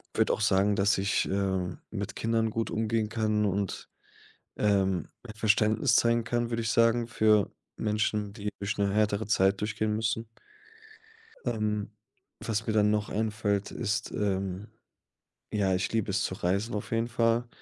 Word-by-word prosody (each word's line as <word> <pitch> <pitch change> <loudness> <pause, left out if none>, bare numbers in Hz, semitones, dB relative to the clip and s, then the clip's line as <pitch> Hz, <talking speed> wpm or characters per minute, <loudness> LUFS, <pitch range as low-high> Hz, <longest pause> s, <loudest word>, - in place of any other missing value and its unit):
würde - - +3
auch - - -3
sagen, 100 0 +3
dass 100 0 +3
ich, 100 +1 +1
äh, 95 -2 -1
mit - - -5
Kindern 115 0 0
gut 115 +1 -2
umgehen 110 0 0
kann 110 -1 +1
und, 100 -1 -2 0.7
ähm, 95 -4 +1 0.3
Verständnis 110 +4 +3
zeigen 115 -1 +3
kann, 120 -1 -1
würde 115 -1 -1
ich 115 - -1
sagen, 115 0 +3
für 110 -3 +3 0.2
Menschen, 105 -1 -1
die 105 0 -4
durch 100 +1 -3
'ne 100 -1 +1
härtere 105 0 +1
Zeit 95 -1 +2
durchgehen 105 0 -1
müssen. 110 +1 -1 1.2
Ähm, 105 -3 -1 0.5
was 110 +1 -2
mir 110 - +1
dann 105 -1 +4
noch 105 0 0
einfällt, 105 -2 -1
ist, 110 0 -2
ähm, 95 0 -2 0.8
ja, 100 -3 +1
ich 90 - -1
liebe 110 -2 0
es 95 - +1
zu - - -2
reisen 100 +6 -1
auf 105 - -5
jeden 115 +1 +1
Fall. 115 0 +1
105 Hz, 155 wpm, -28 LUFS, 100-110 Hz, 1.2 s, dann